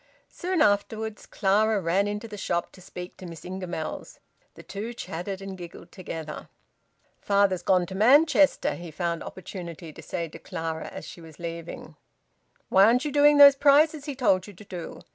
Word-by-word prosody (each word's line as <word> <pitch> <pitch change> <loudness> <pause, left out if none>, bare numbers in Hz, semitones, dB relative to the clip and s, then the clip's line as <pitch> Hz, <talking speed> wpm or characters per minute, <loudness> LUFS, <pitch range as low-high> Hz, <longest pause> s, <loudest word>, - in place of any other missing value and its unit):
Soon 360 -2 0
afterwards 210 +1 -1
Clara 210 +2 +2
ran 190 +3 +1
into 210 +2 -4
the 215 - -8
shop 175 -3 -2
to 185 - -16
speak 180 0 -9
to 185 - -10
Miss 165 -2 -10
Ingamells. 180 -3 -6 0.4
The - - -12
two 215 +4 -6
chatted 190 +1 -6
and 195 -1 -6
giggled 175 -2 -11
together. 160 -4 -7 0.7
"Father's 200 -3 +2
gone 180 0 +2
to 190 - -9
Manchester," 280 - +4
he 175 +3 -8
found 170 +1 -3
opportunity 170 -4 -8
to - - -11
say 170 -2 -4
to 160 - -12
Clara 160 -2 -5
as - - -8
she 170 - -11
was 160 -2 -13
leaving. 170 0 -7 0.7
"Why 190 +1 +6
aren't 245 +6 +3
you 295 - -2
doing 295 +1 +5
those 280 -1 +10
prizes 290 +2 +4
he 290 -3 -5
told 190 -8 +2
you 205 - -11
to 200 +3 -14
do?" 180 -4 -8
190 Hz, 175 wpm, -26 LUFS, 170-220 Hz, 0.7 s, those